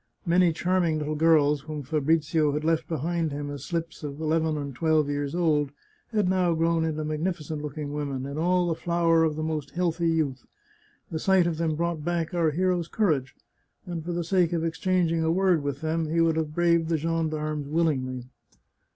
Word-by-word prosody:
Many 175 0 +4
charming 175 -1 +1
little 150 0 -2
girls, 150 -2 +3
whom 150 0 -6
Fabrizio 155 +1 +1
had 150 +1 -2
left 160 0 +1
behind 165 0 -1
him 145 0 -4
as 145 - -7
slips 165 -1 -4
of 145 0 -6
eleven 160 0 0
and 140 -2 -4
twelve 155 +1 +2
years 145 +1 -2
old, 155 -5 +2 0.4
had 210 -5 0
now 180 -2 +2
grown 165 0 +1
into 155 -1 -2
magnificent 155 -1 -3
looking 150 0 -5
women, 140 -3 -3
in 140 +1 -5
all 180 +3 +2
the 170 - +1
flower 165 0 +2
of 155 -2 +1
the 155 - -3
most 155 -3 -3
healthy 170 -1 +1
youth. 150 -5 -1 0.6
The 160 - -2
sight 190 0 +3
of 170 -2 -1
them 160 -1 0
brought 170 -1 -2
back 170 0 -1
our 170 -2 +2
hero's 175 +1 0
courage, 150 - 0 0.5
and 170 -3 -5
for 175 - -4
the 175 0 -1
sake 175 0 +2
of 165 -1 0
exchanging 165 -1 +1
a 160 - +2
word 180 -2 +3
with 140 -1 -4
them, 160 0 -1
he 165 +2 +1
would 165 -1 +3
have 155 -1 -2
braved 170 -1 +2
the 165 - +2
gendarmes 155 -2 -2
willingly. 140 -6 0
160 Hz, 190 wpm, -26 LUFS, 150-170 Hz, 0.6 s, Many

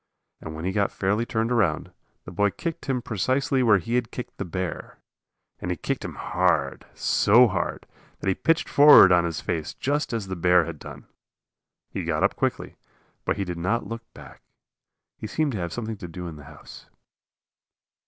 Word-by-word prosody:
And 80 0 -8
when 80 +2 -6
he 95 - 0
got 100 0 0
fairly 105 +5 -1
turned 115 +1 -1
around, 95 -10 +1 0.3
the - - -8
boy 105 +3 +2
kicked 165 - -6
him 125 -3 -1
precisely 130 +6 0
where 110 -4 +5
he 100 +6 -5
had 120 -2 +1
kicked - - -8
the - - -2
bear. 90 +1 -5 0.6
And 90 - -5
he 90 - -1
kicked - - -3
him - - -6
hard, 80 -6 0
so 120 +5 +4
hard 95 -4 -3 0.3
that - - -7
he 95 - +3
pitched 165 - +1
forward 145 -10 +8
on 85 -1 +4
his 85 -2 -3
face 80 -2 -3
just 145 +1 -1
as 115 -4 -2
the 95 -1 -5
bear 90 0 +4
had 80 -2 -7
done. - - -10 0.9
He - - -4
got - - -1
up - - +2
quickly, - - -3 0.5
but - - 0
he 100 - -2
did 90 -2 -5
not 100 +8 -1
look 115 0 -8
back. - - -13 0.8
He 110 - -5
seemed 155 +6 0
to 110 - -4
have 85 -1 -3
something 110 0 -5
to 90 - -8
do 90 +1 -8
in 85 -2 -7
the 75 -1 -12
house. - - -13
100 Hz, 195 wpm, -25 LUFS, 85-120 Hz, 0.9 s, forward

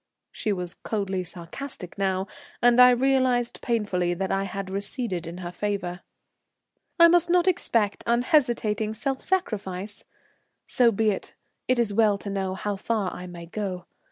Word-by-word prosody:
She 215 - -2
was 180 -3 -3
coldly 195 -4 -3
sarcastic 180 +4 -8
now, 190 -1 0 0.3
and 245 0 +5
I 250 0 +10
realized 250 -1 +2
painfully 190 -7 0
that 190 +1 -2
I 195 0 0
had 195 0 -5
receded 195 -3 -2
in 170 +1 -7
her 175 -1 -6
favour. 190 -2 -3 1.0
"I 335 - +10
must 345 0 +4
not 355 +1 +3
expect 230 - +1
unhesitating 235 -4 +2
self 265 +3 -2
sacrifice? 205 - -2 0.6
So 240 -2 +4
be 220 0 +2
it; 195 - -6 0.3
it 255 - +2
is 230 -4 +1
well 210 -1 +4
to 200 0 -6
know 190 -1 -2
how 205 +1 -3
far 210 -2 -1
I 180 - -7
may 170 -1 -9
go. 180 -1 -4
205 Hz, 155 wpm, -26 LUFS, 190-245 Hz, 1.0 s, I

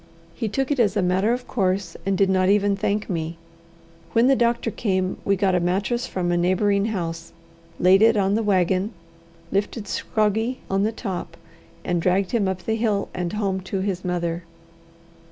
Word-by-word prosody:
He 220 - -3
took 270 +6 -1
it 285 - 0
as 210 -3 +2
a 200 - +2
matter 190 +5 +2
of 250 +1 -2
course, 190 -5 -1
and 195 -1 +1
did 195 - +4
not 185 0 +2
even 200 0 +3
thank 200 +1 -1
me. 165 -2 -3 0.8
When 230 +1 +4
the 270 +1 +5
doctor 235 -1 +1
came, 190 -4 -1
we 200 - +2
got 195 -1 +1
a 180 - +3
mattress 200 +8 0
from 175 -2 -2
a 175 - +2
neighbouring 200 +3 +2
house, 165 -6 -4 0.5
laid 185 +2 +5
it 225 0 +5
on 195 0 +2
the 220 - +2
wagon, 190 0 +1 0.6
lifted 205 +2 -2
Scroggie 220 +5 0
on 195 0 +2
the 215 +2 +1
top, 195 -5 -5 0.5
and 175 -1 0
dragged 185 +2 +1
him 215 -5 +1
up 185 -1 -3
the 220 0 -1
hill 215 -3 0
and 180 0 -3
home 200 -3 -1
to 190 +1 -3
his 190 -2 -2
mother. 175 -1 -2
195 Hz, 185 wpm, -23 LUFS, 185-215 Hz, 0.8 s, the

